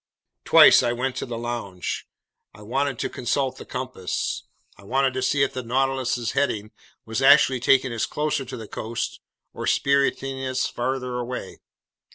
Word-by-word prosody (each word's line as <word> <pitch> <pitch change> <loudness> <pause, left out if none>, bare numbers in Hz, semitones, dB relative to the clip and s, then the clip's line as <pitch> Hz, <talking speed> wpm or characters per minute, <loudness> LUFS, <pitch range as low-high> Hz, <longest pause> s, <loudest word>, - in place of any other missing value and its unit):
Twice - - +8
I 120 -1 0
went 130 +2 -2
to - - -3
the 120 -1 -5
lounge. 115 -6 -4 0.5
I 105 - -13
wanted 135 +4 -1
to - - -1
consult 130 +1 -2
the - - -10
compass. 125 -8 -3 0.3
I - - -18
wanted 130 +5 +1
to 130 - -2
see 135 +2 +2
if 135 - -1
the 130 - -3
Nautilus's 125 -1 0
heading 110 -7 -1 0.3
was 110 +1 -3
actually 135 -2 +6
taking 130 0 +3
us 115 - -1
closer 150 -1 -1
to 130 - -7
the 110 -2 -8
coast 115 +3 -4 0.3
or - - -5
spiriting 135 -1 +1
us 130 0 -1
farther 125 0 -2
away. 120 -5 -6
130 Hz, 165 wpm, -24 LUFS, 120-135 Hz, 0.5 s, Twice